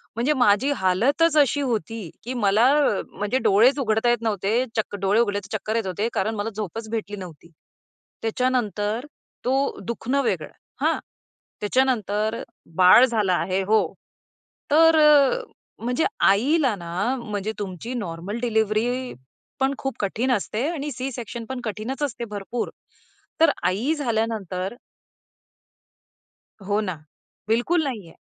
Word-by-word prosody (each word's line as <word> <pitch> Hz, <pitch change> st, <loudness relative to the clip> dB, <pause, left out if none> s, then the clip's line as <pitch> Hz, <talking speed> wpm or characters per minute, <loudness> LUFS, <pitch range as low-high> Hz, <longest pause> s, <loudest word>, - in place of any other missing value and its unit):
म्हणजे 245 Hz, +7 st, +1 dB
माझी 245 Hz, +1 st, +3 dB
हालतच 275 Hz, -, +2 dB
अशी 285 Hz, 0 st, +4 dB
होती 225 Hz, -, -3 dB
की 250 Hz, +3 st, -4 dB
मला 215 Hz, -1 st, +3 dB, 0.5 s
म्हणजे 205 Hz, +5 st, -1 dB
डोळेच 240 Hz, +8 st, +5 dB
उघडता 220 Hz, -2 st, +1 dB
येत 240 Hz, -1 st, +2 dB
नव्हते. 220 Hz, +2 st, 0 dB
चक्क 215 Hz, -2 st, -1 dB
डोळे 200 Hz, +3 st, +3 dB
उघडले 205 Hz, -3 st, 0 dB
तर 205 Hz, +2 st, -7 dB
चक्कर 215 Hz, +2 st, -4 dB
येत 225 Hz, -4 st, 0 dB
होते 200 Hz, +4 st, -1 dB
कारण 220 Hz, +3 st, 0 dB
मला 205 Hz, +1 st, -2 dB
झोपच 220 Hz, +2 st, -5 dB
भेटली 215 Hz, -2 st, -3 dB
नव्हती. 170 Hz, -3 st, -11 dB, 0.7 s
त्याच्यानंतर 225 Hz, -1 st, -1 dB, 0.4 s
तो 270 Hz, +2 st, 0 dB
दुखणं 250 Hz, +4 st, -1 dB
वेगळं, -, -, -1 dB, 0.3 s
हां? -, -, +2 dB, 0.6 s
त्याच्या 255 Hz, +6 st, +3 dB
नंतर 215 Hz, -3 st, -1 dB, 0.3 s
बाळ 185 Hz, +7 st, +8 dB
झाला 215 Hz, -7 st, +1 dB
आहे 185 Hz, +2 st, 0 dB
हो. 215 Hz, +3 st, +3 dB, 0.9 s
तर 325 Hz, +2 st, +6 dB, 0.8 s
म्हणजे 245 Hz, +7 st, 0 dB, 0.2 s
आईला 260 Hz, +4 st, +3 dB
ना, 180 Hz, +8 st, -2 dB
म्हणजे 210 Hz, -2 st, -3 dB
तुमची 205 Hz, +4 st, -5 dB
नॉर्मल 200 Hz, -1 st, -4 dB
डिलिव्हरी 235 Hz, +2 st, 0 dB, 0.5 s
पण 270 Hz, +1 st, +2 dB
खूप 270 Hz, -3 st, -4 dB
कठीण 225 Hz, +6 st, 0 dB
असते 230 Hz, +3 st, -1 dB
आणि 300 Hz, -3 st, -4 dB
सी-सेक्शन 240 Hz, -2 st, -5 dB
पण 260 Hz, -1 st, -4 dB
कठीणच 225 Hz, +6 st, -4 dB
असते 240 Hz, -4 st, -3 dB
भरपूर. 210 Hz, +4 st, -3 dB, 0.7 s
तर 325 Hz, -, +7 dB
आई 230 Hz, +12 st, +1 dB
झाल्यानंतर 220 Hz, -, -2 dB, 1.9 s
हो 205 Hz, +1 st, +1 dB
ना. 185 Hz, -5 st, -3 dB, 0.5 s
बिलकुल 245 Hz, +10 st, +2 dB
नाही 235 Hz, -10 st, -4 dB
आहे -, -, -16 dB
225 Hz, 130 wpm, -24 LUFS, 205-255 Hz, 1.9 s, बाळ